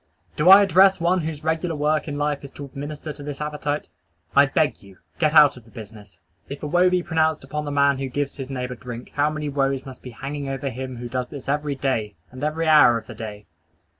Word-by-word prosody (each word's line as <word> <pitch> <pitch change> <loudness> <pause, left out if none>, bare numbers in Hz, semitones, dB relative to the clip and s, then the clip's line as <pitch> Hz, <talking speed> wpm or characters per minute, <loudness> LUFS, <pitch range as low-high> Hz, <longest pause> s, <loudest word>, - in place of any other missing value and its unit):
Do 150 +4 +3
I 195 +1 +10
address 190 0 +5
one 175 +2 +2
whose 155 -2 -5
regular 160 +1 -1
work 150 +2 0
in 145 -1 -4
life 145 -1 -1
is 140 - -8
to 145 - -8
administer 145 +3 -7
to 145 - -12
this 145 -1 -6
appetite? 150 0 -3 0.5
I 140 0 +6
beg 150 +3 0
you 100 -2 -16 0.2
get 155 -1 +2
out 150 -4 +7
of 125 - -13
the 115 - -20
business. 105 -5 -12 0.3
If 140 +2 -8
a - - -2
woe 175 +4 +4
be 180 -1 +1
pronounced 160 -3 0
upon 150 +3 -4
the 145 - -4
man 140 -1 +2
who 135 -1 -3
gives 145 +2 -3
his 135 -1 -6
neighbor 125 -2 -4
drink, 120 -1 -9
how 145 +1 +2
many 155 -1 -4
woes 135 -1 -1
must 130 -1 -11
be 125 - -9
hanging 140 +3 -6
over 135 0 -4
the - - -12
man 130 0 -5
who 120 0 -6
does 125 0 -3
this 140 -1 -10
every 145 0 -1
day, 130 -6 -2 0.2
and 130 +2 -9
every 155 +2 -1
hour 150 -7 +6
of 115 - -8
the - - -9
day! 105 -2 -8
145 Hz, 240 wpm, -23 LUFS, 130-155 Hz, 0.5 s, I